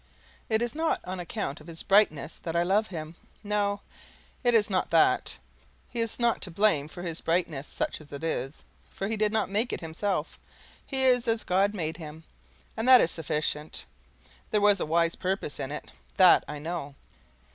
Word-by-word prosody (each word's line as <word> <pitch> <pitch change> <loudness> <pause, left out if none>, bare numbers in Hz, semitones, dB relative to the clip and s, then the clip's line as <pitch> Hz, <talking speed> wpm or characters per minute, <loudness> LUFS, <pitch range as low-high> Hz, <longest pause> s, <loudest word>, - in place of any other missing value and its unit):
It 220 +1 +2
is 240 - -2
not 320 +1 0
on 185 0 -5
account 175 -4 -4
of 155 - -15
his 165 -1 -4
brightness 195 -7 +3
that 165 -1 -5
I 170 - +3
love 205 +5 +2
him 160 -2 -7 0.3
no, 205 -1 0 0.6
it 240 -1 +4
is 210 -2 +5
not 185 -3 0
that. 165 - +3 0.5
He 240 - -5
is 230 -1 -1
not 235 -1 +2
to 185 - 0
blame 170 -5 +2
for 175 +3 -9
his 165 -2 -3
brightness, 165 -4 -1
such - - -3
as 150 - -15
it 140 +2 -7
is, 140 -3 -3 0.3
for 195 - -4
he 225 - -1
did 215 -1 +1
not 220 -1 +1
make 215 +5 0
it - - -3
himself; 165 0 -3 0.4
he 265 -2 -1
is 250 -2 +4
as 225 0 +1
God 195 +3 +2
make 160 -4 -3
him, 160 -1 -9 0.5
and 225 +2 -2
that 255 -1 +10
is 165 - +3
sufficient. 150 -1 -2 0.6
There 210 - +2
was 205 -1 +4
a - - -2
wise 165 +1 +2
purpose 190 -5 -3
in 135 - -4
it, 150 - -7 0.3
THAT 185 -2 +7
I 150 - -5
know. 150 -2 -5
180 Hz, 190 wpm, -28 LUFS, 160-215 Hz, 0.6 s, that